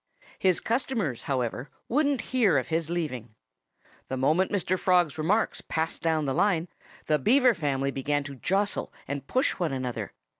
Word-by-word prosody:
His 185 Hz, -2 st, +3 dB
customers, 225 Hz, -, -1 dB
however, 125 Hz, 0 st, -2 dB, 0.2 s
wouldn't 280 Hz, -1 st, +1 dB
hear 220 Hz, -, +4 dB
of 130 Hz, -, -1 dB
his 165 Hz, -1 st, 0 dB
leaving. 130 Hz, -10 st, -3 dB, 0.7 s
The 130 Hz, -, -3 dB
moment 155 Hz, +8 st, +2 dB
Mr. 185 Hz, -2 st, +1 dB
Frog's 175 Hz, -4 st, +2 dB
remarks 200 Hz, +8 st, +1 dB
passed 160 Hz, 0 st, -2 dB
down 160 Hz, -2 st, +1 dB
the 135 Hz, -, 0 dB
line, 180 Hz, -1 st, +1 dB, 0.4 s
the 150 Hz, -1 st, +2 dB
Beaver 250 Hz, -, +5 dB
family 140 Hz, -5 st, -1 dB
began 145 Hz, +2 st, -1 dB
to 140 Hz, 0 st, -7 dB
jostle 195 Hz, -, -1 dB, 0.2 s
and 140 Hz, 0 st, -4 dB
push 260 Hz, +2 st, +2 dB
one 170 Hz, -4 st, 0 dB
another. 130 Hz, -2 st, -3 dB
160 Hz, 155 wpm, -27 LUFS, 135-200 Hz, 0.7 s, Beaver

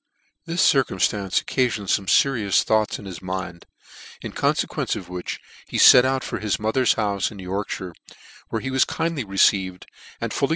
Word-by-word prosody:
This 170 Hz, +2 st, +2 dB
circumftance 100 Hz, -6 st, +1 dB
occafioned 120 Hz, -6 st, -1 dB
fome 95 Hz, 0 st, 0 dB
ferious 115 Hz, -8 st, +3 dB
thoughts 110 Hz, -1 st, +1 dB
in 105 Hz, -, -12 dB
his 95 Hz, -4 st, -8 dB
mind, 95 Hz, -1 st, -6 dB, 0.6 s
in -, -, -5 dB
confequence -, -, -1 dB
of -, -, -8 dB
which 90 Hz, -1 st, -5 dB, 0.3 s
he -, -, -4 dB
fet 125 Hz, 0 st, +8 dB
out 130 Hz, 0 st, 0 dB
for -, -, -4 dB
his 105 Hz, -2 st, -1 dB
mother's 110 Hz, +3 st, +1 dB
houfc 100 Hz, -2 st, -1 dB
in 105 Hz, -, -11 dB
YorkuY.re, 95 Hz, -1 st, -5 dB, 0.6 s
where 110 Hz, -, -3 dB
he 135 Hz, -, -4 dB
was 130 Hz, 0 st, +3 dB
kindly 165 Hz, -4 st, -2 dB
received,. 95 Hz, -2 st, +1 dB, 0.3 s
and -, -, -4 dB
fully 140 Hz, -, 0 dB
105 Hz, 165 wpm, -23 LUFS, 95-130 Hz, 0.6 s, fet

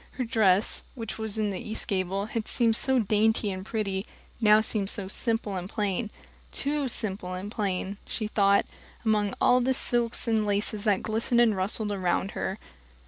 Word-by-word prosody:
Her 255 Hz, -, -2 dB
dress, 215 Hz, -4 st, +3 dB
which, 225 Hz, -5 st, -6 dB
in 215 Hz, -1 st, -1 dB
the 190 Hz, -, -4 dB
east 220 Hz, +1 st, -3 dB
gable, 195 Hz, -1 st, -1 dB
had 220 Hz, 0 st, -4 dB
seemed 230 Hz, -2 st, +2 dB
so 265 Hz, +2 st, +1 dB
dainty 215 Hz, -1 st, +2 dB
and 185 Hz, 0 st, -5 dB
pretty, 200 Hz, -1 st, -3 dB, 0.3 s
now 215 Hz, -1 st, +6 dB
seemed 215 Hz, -2 st, -1 dB
simple 210 Hz, +1 st, -2 dB
and 180 Hz, 0 st, -4 dB
plain 205 Hz, +1 st, -1 dB, 0.4 s
too 285 Hz, 0 st, -1 dB
simple 190 Hz, -6 st, -4 dB
and 195 Hz, +3 st, -6 dB
plain, 200 Hz, -3 st, -2 dB
she 220 Hz, -, -2 dB
thought, 200 Hz, -2 st, +3 dB, 0.4 s
among 210 Hz, -2 st, +1 dB
all 250 Hz, 0 st, +4 dB
the 260 Hz, +1 st, +2 dB
silks 240 Hz, -1 st, 0 dB
and 220 Hz, -1 st, +2 dB
laces 205 Hz, +1 st, 0 dB
that 205 Hz, -3 st, +2 dB
glistened 225 Hz, +2 st, +1 dB
and 230 Hz, -3 st, +4 dB
rustled 205 Hz, +3 st, 0 dB
around 190 Hz, 0 st, 0 dB
her. 190 Hz, -, -3 dB
210 Hz, 165 wpm, -27 LUFS, 195-225 Hz, 0.4 s, now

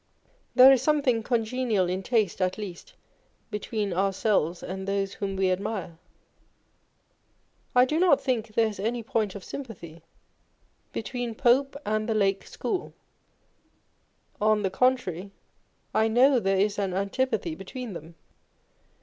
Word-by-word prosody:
There 260 Hz, +1 st, +9 dB
is 265 Hz, -3 st, +4 dB
something 270 Hz, -5 st, +2 dB
congenial 225 Hz, -3 st, 0 dB
in 185 Hz, +2 st, -2 dB
taste, 210 Hz, -3 st, 0 dB
at 185 Hz, 0 st, 0 dB
least, 210 Hz, -, -8 dB, 0.6 s
between 210 Hz, -1 st, -2 dB
ourselves 190 Hz, -2 st, 0 dB
and 190 Hz, +1 st, -5 dB
those 195 Hz, 0 st, -1 dB
whom 195 Hz, -1 st, -4 dB
we 190 Hz, -1 st, +2 dB
admire. 185 Hz, -3 st, -3 dB, 1.8 s
I 250 Hz, 0 st, +7 dB
do 305 Hz, +5 st, 0 dB
not 345 Hz, -6 st, +5 dB
think 225 Hz, -5 st, -2 dB
there 230 Hz, -, +4 dB
is 215 Hz, -3 st, -4 dB
any 230 Hz, +3 st, -2 dB
point 215 Hz, -3 st, -1 dB
of 200 Hz, -, -8 dB
sympathy 175 Hz, -, -8 dB, 0.9 s
between 245 Hz, -3 st, -4 dB
Pope 270 Hz, +3 st, +3 dB
and 215 Hz, +1 st, -1 dB
the 220 Hz, -, +1 dB
Lake 195 Hz, -2 st, +2 dB, 0.2 s
On -, -, +1 dB
Envy. 390 Hz, -, +3 dB, 1.6 s
141 -, -, -27 dB
School: 215 Hz, -, +2 dB
on 215 Hz, -1 st, +3 dB
the 190 Hz, -1 st, -2 dB
contrary, 200 Hz, -8 st, +1 dB, 0.6 s
I 220 Hz, -, +3 dB
know 250 Hz, +4 st, +5 dB
there 195 Hz, -3 st, +1 dB
is 205 Hz, +1 st, +1 dB
an 190 Hz, -2 st, -1 dB
antipathy 200 Hz, -2 st, -1 dB
between 215 Hz, -, -7 dB
them. 165 Hz, 0 st, -10 dB
215 Hz, 140 wpm, -27 LUFS, 190-245 Hz, 1.8 s, There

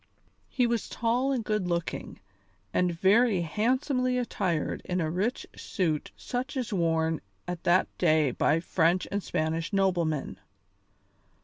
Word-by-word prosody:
He 250 Hz, -3 st, +1 dB
was 235 Hz, -2 st, -1 dB
tall 245 Hz, +4 st, 0 dB
and 255 Hz, -4 st, 0 dB
good 210 Hz, -4 st, 0 dB
looking, 170 Hz, -1 st, -3 dB, 0.5 s
and 180 Hz, -1 st, +2 dB
very 195 Hz, +4 st, +3 dB
handsomely 255 Hz, -, 0 dB
attired 190 Hz, -9 st, -1 dB
in 180 Hz, 0 st, -2 dB
a 160 Hz, -2 st, -1 dB
rich 205 Hz, +9 st, -1 dB
suit 160 Hz, -6 st, -2 dB
such 255 Hz, +3 st, -4 dB
as 245 Hz, -3 st, -2 dB
was 190 Hz, -, 0 dB
worn 160 Hz, -2 st, +1 dB, 0.3 s
at 175 Hz, -1 st, -5 dB
that 175 Hz, +2 st, +4 dB
day 155 Hz, -5 st, +3 dB
by 155 Hz, +6 st, +2 dB
French 175 Hz, +1 st, +1 dB
and 200 Hz, +1 st, -1 dB
Spanish 165 Hz, 0 st, -2 dB
noblemen. 175 Hz, -7 st, 0 dB
185 Hz, 135 wpm, -28 LUFS, 165-235 Hz, 0.5 s, that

